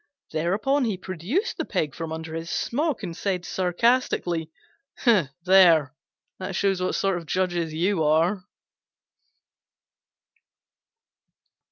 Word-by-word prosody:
Thereupon 205 - +1
he 215 -5 -1
produced 190 - -3
the - - -1
pig 150 -3 -2
from 165 +1 -6
under 160 0 -6
his 165 +1 -5
smock 290 - -1
and 170 -3 -5
said 185 -2 -2
sarcastically, 180 -4 0 0.6
"There, 175 - +4 0.5
that 190 0 -5
shows 195 -1 +1
what 185 - 0
sort 195 -2 +1
of 165 - -13
judges 175 -3 -1
you 170 +2 0
are!" 165 +6 +2
180 Hz, 110 wpm, -25 LUFS, 165-200 Hz, 0.6 s, There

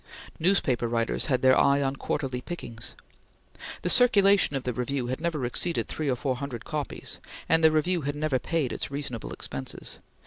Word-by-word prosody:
Newspaper 155 -9 +2
writers 115 0 0
had 130 -4 +1
their 130 0 +7
eye 140 0 +4
on 135 -1 0
quarterly 135 -2 -2
pickings. 120 -11 -7 0.9
The 180 - 0
circulation 200 - +5
of 135 - -2
the 125 - -2
Review 125 +2 -2
had 130 +4 -3
never 160 -6 -1
exceeded 165 +7 -1
three 155 -2 -2
or 130 - +2
four 130 +1 -2
hundred 130 -4 -6
copies, 150 -3 -4 0.3
and 165 0 +3
the 160 - +8
Review 165 +3 +1
had 145 0 -2
never 150 -3 0
paid 160 -5 -1
its - - -3
reasonable 140 -5 -4
expenses. 70 -1 -4
140 Hz, 175 wpm, -27 LUFS, 125-160 Hz, 0.9 s, the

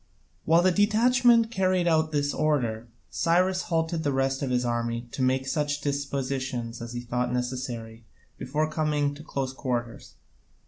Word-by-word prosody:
While 165 +2 +4
the 185 - +4
detachment 230 +3 +4
carried 185 -4 +1
out 160 -1 +2
this 145 -1 0
order 120 -7 0 0.2
Cyrus 185 +2 +2
halted 165 -1 -1
the 145 -3 0
rest 135 0 0
of 135 - -1
his 125 0 +1
army 120 0 -2
to - - -4
make 130 +1 +1
such 145 +1 -1
dispositions 135 -4 -3
as 115 0 -6
he 120 - -4
thought 125 0 -2
necessary 125 -2 -4 0.4
before 150 +4 -1
coming 150 -2 0
to 145 - -11
close 135 -4 -3
quarters. 120 -4 -4
140 Hz, 150 wpm, -26 LUFS, 125-160 Hz, 0.4 s, While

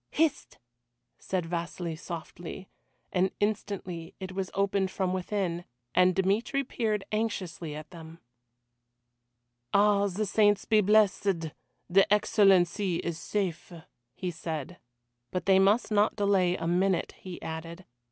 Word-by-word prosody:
"Hist!" 315 -2 0 0.6
said 185 -3 -2
Vasili 170 0 -4
softly, 170 +2 -8 0.4
and 185 +1 +2
instantly 195 -5 -3
it 190 -1 -6
was 190 0 -3
opened 195 -1 +1
from 185 -1 -1
within, 185 -2 -2 0.3
and 180 0 +4
Dmitry 205 +8 +1
peered 220 -5 -1
anxiously 185 -8 -3
at 155 0 -9
them. 165 -1 -11 1.6
"Ah, 205 0 +4
the 200 +3 -2
saints 205 0 +3
be 215 -2 +4
blessed, 195 -5 +2 0.4
the 195 +2 +4
Excellency 195 -3 +4
is 165 -1 -3
safe," 185 -3 -3 0.4
he 180 -1 -3
said. 160 +1 -5 0.5
But 180 - -3
they 190 -1 +5
must 205 +5 +3
not 210 0 +3
delay 195 -3 +2
a - - -4
minute, 180 +2 +1
he 185 -2 -8
added. 165 +3 -6
190 Hz, 125 wpm, -29 LUFS, 175-205 Hz, 1.6 s, they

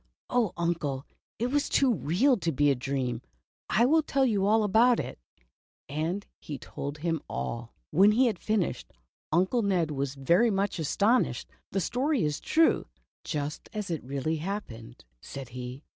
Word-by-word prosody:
"Oh, 240 -6 +2
Uncle, 160 -6 -1 0.3
it 240 +2 -1
was 290 0 +1
too 265 -3 +3
real 220 - +2
to 170 -6 -1
be 145 0 +3
a - - +2
dream, 125 -2 -2 0.5
I 225 +9 +4
will 315 +5 +4
tell 275 -3 +1
you 200 -5 +2
about 220 +3 +4
it," - - -5 0.7
and 160 +8 -2
he 145 - -6
told 140 +3 -6
him 165 0 -1
all. 115 0 -4 0.2
When 200 +5 +6
he 255 +4 +4
had 220 -7 0
finished. 215 -4 -1 0.4
Uncle 185 +9 +2
Ned 180 -6 +1
was 140 -1 -2
very 170 - +3
much 195 -3 0
astonished. 205 - +1 0.2
"The 195 - 0
story 265 - 0
is 150 -1 -1
true, 325 0 +3 0.4
just 150 -1 -4
as 210 -4 -4
it 160 - -3
really 140 +5 -2
happened," 125 - -6 0.2
said 135 -3 -8
he. 125 +3 -7
175 Hz, 160 wpm, -28 LUFS, 140-220 Hz, 0.7 s, When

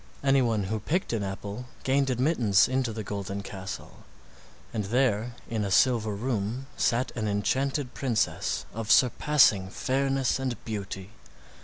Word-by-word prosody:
Anyone 125 -6 +3
who 110 +3 -2
picked 160 - -1
an 115 - 0
apple 100 +4 -5 0.2
gained 135 +1 +2
admittance 125 - +3
into 130 -2 0
the 110 0 -5
golden 100 0 -4
castle, 95 -1 -7 0.8
and 105 -3 -2
there 120 0 +1
in 110 -3 -2
a 100 - -2
silver 110 0 +3
room 115 +2 -2
sat 125 +2 +1
an 110 -2 -2
enchanted 130 +6 0
princess 125 -5 -1
of 115 -1 -5
surpassing 125 -7 +4
fairness 135 +3 0
and 130 -3 -2
beauty. 100 -2 -5
115 Hz, 135 wpm, -27 LUFS, 100-130 Hz, 0.8 s, surpassing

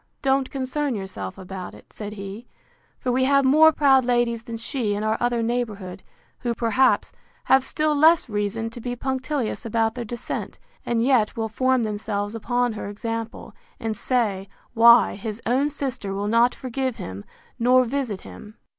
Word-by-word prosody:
Don't 270 -1 +2
concern 270 0 -2
yourself 100 - -6
about 185 -1 -8
it, - - -18
said 210 -1 -7
he; 200 +3 -8 0.5
for 250 - -1
we 260 +1 +2
have 275 0 +4
more 310 +4 +7
proud 270 -4 +4
ladies 240 -1 +1
than 230 -1 -7
she 230 -3 -2
in 205 - -3
our 215 0 +1
other 240 -1 0
neighbourhood, 210 -6 -3 0.4
who, 240 -1 -2
perhaps, 250 +3 +2 0.3
have 265 0 +4
still 305 +2 0
less 315 +2 +5
reason 210 +1 -2
to 235 - -9
be 245 +1 -3
punctilious 265 0 -2
about 225 0 0
their 245 - -5
descent, 235 +1 -5 0.3
and 230 -1 +1
yet 245 -5 +2
will 225 -1 -2
form 255 +2 +1
themselves 205 -1 -3
upon 245 +1 0
her 205 -1 -6
example, 225 +2 -5 0.3
and 225 -1 -2
say, 205 -5 -1 0.2
Why, 235 +1 +7
his 210 +2 -6
own 265 +5 +2
sister 260 -9 -4
will 200 +1 -2
not 235 +3 +3
forgive 260 -1 -3
him, 95 +1 -7 0.4
nor 250 +2 +5
visit 245 -5 -3
him! 215 +1 -12
235 Hz, 165 wpm, -24 LUFS, 215-260 Hz, 0.5 s, more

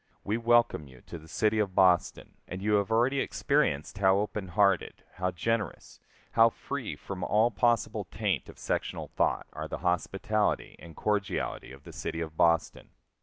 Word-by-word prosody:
We 105 - -1
welcome 115 -9 +2
you 65 -2 -16
to 85 - -9
the 80 - -15
city 110 +5 +1
of 100 -3 -1
Boston, 90 -2 +2
and 95 - -6
you 105 0 +1
have 100 0 -1
already 120 +5 +2
experienced 75 - 0
how 95 -1 +5
open 105 -1 -2
hearted, 100 +2 +1
how 90 0 0
generous, 100 +1 -3 0.3
how 115 0 +6
free 135 +1 -5
from 95 -2 -7
all 110 +5 +3
possible 115 -3 +1
taint 100 -1 -2
of - - -12
sectional - - -3
thought - - 0
are - - -5
the - - -5
hospitality 95 +4 0
and 85 -1 -12
cordiality 105 -8 -2
of 70 +1 -13
the - - -11
city 80 - -4
of 80 -2 -5
Boston. 85 0 +1
100 Hz, 170 wpm, -29 LUFS, 90-110 Hz, 0.3 s, how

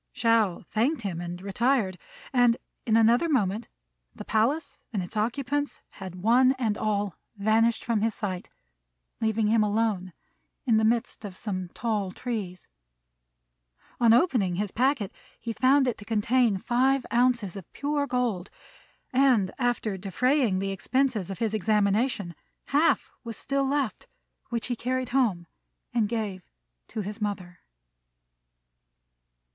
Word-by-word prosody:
Shao 225 -6 +2
thanked 235 +5 0
him 175 -4 -3
and 175 0 -5
retired; 200 -2 +1 0.3
and 245 -2 +4 0.3
in 220 0 +4
another 235 +8 +4
moment 215 -5 +1 0.5
the - - -8
palace 280 +8 0
and 200 -5 -1
its 175 - -10
occupants 275 +6 -1
had 190 -3 -8
one 255 +4 +5
and 235 -6 -1
all 205 -3 -1 0.2
vanished 220 +3 +2
from 225 -3 +1
his 225 0 0
sight, 185 -4 -4 0.7
leaving 220 0 +1
him 220 +1 +3
alone 210 -3 0 0.5
in 230 -4 +4
the 220 - +2
midst 230 +1 0
of 195 -3 -7
some 185 -4 -3
tall 210 -5 -1
trees. 200 -6 -5 1.3
On 235 -2 +5
opening 230 - +3
his 200 +1 -2
packet 250 -5 +1 0.3
he 230 - -4
found 265 +3 +4
it 245 - -1
to - - -9
contain 225 0 +2
five 255 +5 +1
ounces 240 -6 +2
of 195 -4 -9
pure 285 0 -1
gold; 240 -8 -1 0.6
and, 250 -8 +4
after 240 -5 0
defraying 225 +3 +1
the 195 +1 -1
expenses 235 0 0
of 195 - -5
his 225 -2 -1
examination, 210 -1 +1 0.4
half 305 +4 +3
was 230 -3 -6
still 275 0 0
left, 275 -4 -1 0.4
which 235 -2 -2
he 245 - -2
carried 255 +1 -2
home 230 -10 +1 0.5
and 220 -4 +1
gave 215 -5 -3 0.5
to 220 - -4
his 210 +2 -6
mother. 185 -4 -4
225 Hz, 135 wpm, -27 LUFS, 200-250 Hz, 1.3 s, one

